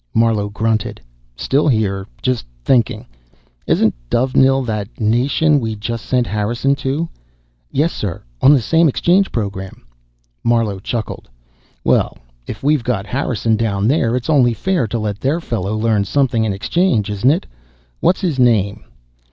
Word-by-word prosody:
Marlowe 115 -3 +2
grunted. 110 +1 -1 0.4
"Still 135 - +1
here. 100 -6 0 0.2
Just 125 - -1 0.2
thinking. 120 -2 +2 0.6
Isn't - - +3 0.2
Dovenil 135 +2 +3
that 105 +1 -4
nation 130 +7 +2
we 110 -3 -3
just 115 +2 -5
sent 125 -2 +2
Harrison 120 +6 0
to?" 140 +5 -2 0.6
"Yes, 155 +5 0
sir. 95 -6 -4 0.2
On 140 - +7
the 140 -5 +4
same 165 +7 +3
exchange 185 +8 +2
program." 100 - -5 0.6
Marlowe 115 -4 +1
chuckled. 110 - -5 0.5
"Well, - - +1 0.3
if 110 - -7
we've 145 -2 +2
got 115 -5 -1
Harrison 115 -1 0
down 105 -2 0
there, 125 -4 +2
it's 125 - -3
only 130 -7 +3
fair 185 -8 0
to 120 - -3
let 105 -2 -3
their 140 +7 0
fellow 110 - -3
learn 110 -2 +1
something 120 0 +1
in 110 - 0
exchange, 110 - +1
isn't 105 +5 +2
it? 160 +5 +1 0.5
What's 185 - +2
his 165 -8 -1
name?" 110 -5 +2
115 Hz, 145 wpm, -18 LUFS, 105-135 Hz, 0.6 s, On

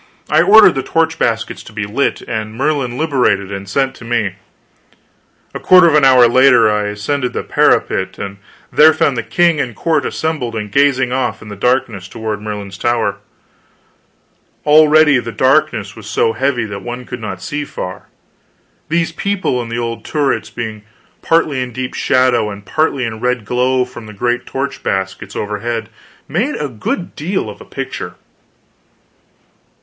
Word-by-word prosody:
I - - +5
ordered 210 -3 +7
the 135 - -2
torch 165 +3 0
baskets 115 -1 -1
to - - -13
be 105 -1 -4
lit, 115 +8 -1
and 110 -1 -5
Merlin 135 -2 -1
liberated 125 -11 +1
and 100 0 -6
sent 135 +5 0
to - - -12
me. 115 -5 -1 1.2
A - - -5
quarter 180 -1 +6
of 160 - +3
an 150 - +4
hour 130 -2 +7
later 125 -2 +5
I 105 0 0
ascended 115 +6 -2
the - - -3
parapet 95 0 +1
and 100 0 -6 0.3
there 155 +1 +6
found 145 -3 +1
the 120 - -1
king 155 +9 +2
and 130 - -1
the - - -13
court 165 +4 0
assembled 150 -8 -3
and 105 -2 -4
gazing 130 -2 +2
off 130 -3 -2
in 105 - -11
the 105 - -7
darkness 120 -3 0
toward 110 0 -5
Merlin's 105 -2 -6
Tower. 120 -1 0 1.5
Already 150 -2 +6
the 115 -1 -5
darkness 130 -6 +1
was 110 -3 -11
so 115 +1 +1
heavy 130 -3 0
that 100 -2 -6
one 120 +2 -6
could - - -7
not 95 -4 -5
see 145 +9 -4
far; 90 -9 -7 0.8
these 165 +1 0
people 190 -8 -1
and 115 -1 -7
the 115 - -2
old 115 -1 -4
turrets, 145 -3 -1
being 110 -3 -6 0.4
partly 155 -5 +1
in 125 -1 -4
deep 125 +2 -5
shadow 125 -4 +2
and 100 0 -9
partly 140 +1 0
in 115 - -3
the 110 - -9
red 125 -2 -1
glow 125 +2 +1
from 120 -3 -11
the 105 - -10
great 120 +4 -1
torch 135 +1 -4
baskets 95 0 -3
overhead, 110 +2 -3 0.4
made 220 - -1
a 145 - -3
good 125 - -4
deal 185 +6 -2
of - - -14
a - - -11
picture. - - -6
125 Hz, 170 wpm, -16 LUFS, 110-145 Hz, 1.5 s, ordered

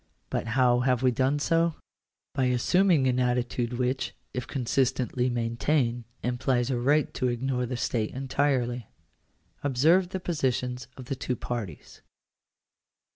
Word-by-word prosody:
But - - -1
how 125 -2 +4
have 125 0 +1
we 130 - +5
done 130 +4 +1
so? 165 +2 +2 0.6
By 135 -2 +1
assuming 150 +5 +3
an 125 -1 +2
attitude 125 -1 0
which, 125 +2 -1 0.2
if 125 - -4
con 130 -3 -3
sistently 125 0 +1
maintained, 120 +1 0 0.2
implies 125 0 0
a 125 - 0
right 145 +4 +2
to 130 - 0
ignore 125 +1 -1
the 125 0 -3
state 110 -2 -1
entirely. 130 -3 -1 0.8
Observe 160 +7 +3
the 190 - -3
positions 130 -7 -1
of 130 - -8
the 135 - -3
two 125 0 -2
parties. 115 -11 -6
125 Hz, 135 wpm, -27 LUFS, 120-135 Hz, 0.8 s, we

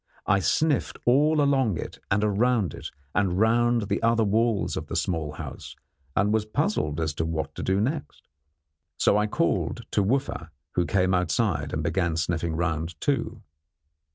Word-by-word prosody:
I 100 - +3
sniffed 145 - +1
all 150 +5 +4
along 135 - +2
it - - -7
and 105 +2 +2 0.2
round 120 -6 +2
it, - - -7 0.2
and 95 -3 +1
round 120 +2 +3
the 100 0 -1
other 115 0 +3
walls 110 +1 +1
of - - -5
the - - -5
small 80 -4 -1
house, - - -8 0.4
and 105 +2 +2
was 110 -1 +2
puzzled 110 - -1
as 80 -1 -1
to 80 - -2
what 80 -1 -3
to - - -7
do 95 +1 +1
next. 140 +7 -3 0.7
So - - +3
I 105 0 +2
called 120 -3 -1
to 105 - +2
Wooffa, 115 - -1 0.2
who 90 - 0
came 95 -1 +2
outside 90 -3 0
and 75 - -2
began 85 +1 0
sniffing 80 0 -1
round, 80 -1 -2
too. 115 -6 -1
100 Hz, 165 wpm, -26 LUFS, 85-120 Hz, 0.7 s, all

